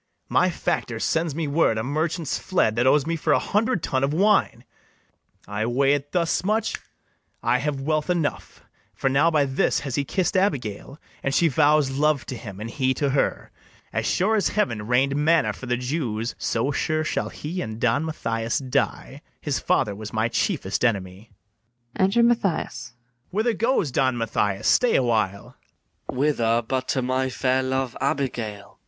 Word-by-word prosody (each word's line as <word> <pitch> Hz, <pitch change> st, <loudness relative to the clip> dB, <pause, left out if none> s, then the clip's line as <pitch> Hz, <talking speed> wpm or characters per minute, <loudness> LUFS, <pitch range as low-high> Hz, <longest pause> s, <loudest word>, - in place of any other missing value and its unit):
My -, -, +3 dB
factor -, -, -2 dB
sends 160 Hz, -3 st, 0 dB
me 160 Hz, -1 st, -2 dB
word 140 Hz, -6 st, +2 dB
a 110 Hz, -, -1 dB
merchant's 155 Hz, +4 st, -1 dB
fled 140 Hz, -, +1 dB
That 120 Hz, +2 st, +2 dB
owes 145 Hz, +1 st, +4 dB
me 165 Hz, +1 st, -1 dB
for 160 Hz, -, +1 dB
a -, -, +5 dB
hundred 210 Hz, -2 st, 0 dB
tun 130 Hz, 0 st, 0 dB
of 140 Hz, +2 st, 0 dB
wine: 205 Hz, +3 st, +2 dB, 0.8 s
I 100 Hz, +2 st, -2 dB
weigh 135 Hz, +3 st, +3 dB
it 145 Hz, 0 st, -2 dB
thus 170 Hz, -2 st, +1 dB
much[snapping 215 Hz, +4 st, 0 dB
his -, -, -5 dB
fingers]! -, -, -31 dB, 0.5 s
I 125 Hz, -, +3 dB
have 140 Hz, 0 st, -2 dB
wealth 155 Hz, +3 st, -1 dB
enough; 170 Hz, -5 st, -2 dB, 0.3 s
For 135 Hz, -, 0 dB
now 145 Hz, +5 st, +4 dB
by 150 Hz, -3 st, +2 dB
this 135 Hz, -1 st, +1 dB
has 140 Hz, -3 st, -5 dB
he 145 Hz, -, 0 dB
kiss'd 185 Hz, +6 st, -1 dB
Abigail, 140 Hz, -, -1 dB, 0.2 s
And 135 Hz, +1 st, -1 dB
she 170 Hz, -, +4 dB
vows 150 Hz, -1 st, +3 dB
love 145 Hz, +1 st, +1 dB
to 130 Hz, -, -5 dB
him, 100 Hz, -5 st, -9 dB
and 110 Hz, +2 st, -6 dB
he 130 Hz, -1 st, 0 dB
to 140 Hz, -2 st, 0 dB
her. 140 Hz, -, -1 dB, 0.4 s
As -, -, -1 dB
sure 210 Hz, +5 st, +2 dB
as 210 Hz, -, +2 dB
heaven 115 Hz, -, -1 dB
rain'd 130 Hz, +3 st, +2 dB
manna 150 Hz, -7 st, +2 dB
for 130 Hz, -, -9 dB
the 125 Hz, 0 st, 0 dB
Jews, 125 Hz, -4 st, -2 dB
So 115 Hz, +5 st, 0 dB
sure 155 Hz, +2 st, 0 dB
shall -, -, -2 dB
he 170 Hz, +5 st, -5 dB
and 110 Hz, 0 st, -5 dB
Don 125 Hz, +5 st, +2 dB
Mathias 115 Hz, -7 st, -2 dB
die: 130 Hz, -3 st, -2 dB, 0.2 s
His -, -, -2 dB
father 105 Hz, -, +1 dB
was 105 Hz, +1 st, -8 dB
my 110 Hz, +1 st, 0 dB
chiefest 125 Hz, -, -1 dB
enemy. 100 Hz, -2 st, -1 dB, 0.7 s
Enter 195 Hz, +5 st, +3 dB
MATHIAS. 180 Hz, -, 0 dB, 0.4 s
Whither 220 Hz, +4 st, +1 dB
goes 225 Hz, -, +1 dB
Don 130 Hz, -1 st, +1 dB
Mathias? 105 Hz, -3 st, -1 dB
stay 250 Hz, -2 st, +4 dB
a -, -, +3 dB
while. 110 Hz, -5 st, -1 dB, 0.5 s
MATHIAS. -, -, -4 dB
Whither, 120 Hz, -5 st, +2 dB
but 130 Hz, 0 st, -1 dB
to 130 Hz, -, 0 dB
my 130 Hz, +1 st, 0 dB
fair 130 Hz, +1 st, +1 dB
love 130 Hz, -1 st, -2 dB
Abigail? 135 Hz, -5 st, -1 dB
BARABAS. 100 Hz, -, -20 dB
135 Hz, 180 wpm, -24 LUFS, 120-160 Hz, 0.8 s, a